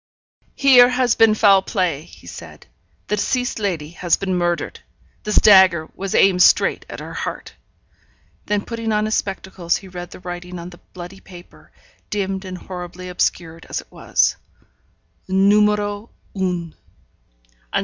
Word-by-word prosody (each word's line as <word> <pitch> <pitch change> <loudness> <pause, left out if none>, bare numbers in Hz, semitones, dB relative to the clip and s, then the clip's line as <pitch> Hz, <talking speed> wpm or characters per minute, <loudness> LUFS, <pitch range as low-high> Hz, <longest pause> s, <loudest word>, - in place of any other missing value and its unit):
'Here 250 -3 +7
has 250 -1 +2
been 225 -1 +4
foul 200 -3 +5
play,' 180 -7 -2
he 175 - -17
said. 85 - -11 0.4
'The 210 - -1
deceased 245 +3 -1
lady 170 -7 -3
has 175 0 0
been 190 -1 -2
murdered. 175 -1 -1 0.5
This 210 - -1
dagger 190 -6 +6
was 195 0 -4
aimed 185 -2 +4
straight - - +4
at - - -7
her - - -8
heart.' - - -6 0.9
Then 205 -1 -1
putting 230 -1 -4
on 210 0 +1
his 215 - -2
spectacles, 190 -4 -2
he 195 - -12
read 175 -1 -8
the - - -12
writing 180 0 -7
on 170 +1 -8
the 175 - -15
bloody 180 +1 -9
paper, 175 -2 -15 0.4
dimmed 195 -1 -3
and 185 -1 -6
horribly 180 0 -8
obscured 165 -2 -2
as - - -2
it - - -13
was: - - +1 0.9
NUMÉRO 205 +2 +2 0.2
UN. 180 -4 -3
190 Hz, 145 wpm, -20 LUFS, 175-210 Hz, 0.9 s, Here